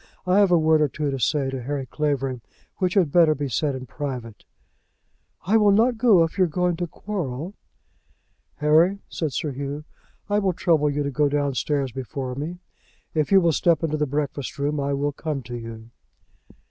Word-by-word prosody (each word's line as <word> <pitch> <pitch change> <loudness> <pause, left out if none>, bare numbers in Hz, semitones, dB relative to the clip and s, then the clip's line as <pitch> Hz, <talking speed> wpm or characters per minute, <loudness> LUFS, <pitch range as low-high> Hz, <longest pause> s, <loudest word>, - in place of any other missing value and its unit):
I 185 +2 +4
have 200 -2 +5
a 175 - +5
word 160 -1 +3
or 150 - +4
two 145 +1 -3
to 135 - -3
say 135 +2 +1
to 135 -1 -4
Harry 135 +2 -3
Clavering, 135 -2 -2 0.4
which 185 +1 0
had 175 -8 +3
better 165 -2 +5
be 145 0 -3
said 140 +3 -1
in 130 -1 -6
private." 125 -6 -6 1.0
"I 210 +5 +4
will 210 -2 +4
not 225 +3 +3
go 220 -8 +6
if 165 +4 -4
you 185 - +6
are - - -1
going 180 +2 0
to 175 0 -2
quarrel." 170 -3 -5 1.0
"Harry," 160 +6 +3
said 160 -4 -3
Sir 145 +3 -2
Hugh, 140 +2 -5 0.4
"I 205 0 +2
will 195 -3 +1
trouble 160 -4 +2
you 145 0 -1
to 140 - -2
go 145 +2 +2
downstairs 140 -1 -1
before 130 +1 -5
me. 155 +7 -5 0.6
If 155 +1 0
you 195 - +8
will 170 -2 +3
step 165 +1 +2
into 155 -1 0
the 150 0 0
breakfast 140 -1 -3
room 145 +1 -1
I 140 0 -1
will 145 +1 -1
come 145 -2 -4
to 120 +1 -7
you." 115 -1 -8
150 Hz, 195 wpm, -24 LUFS, 135-175 Hz, 1.0 s, you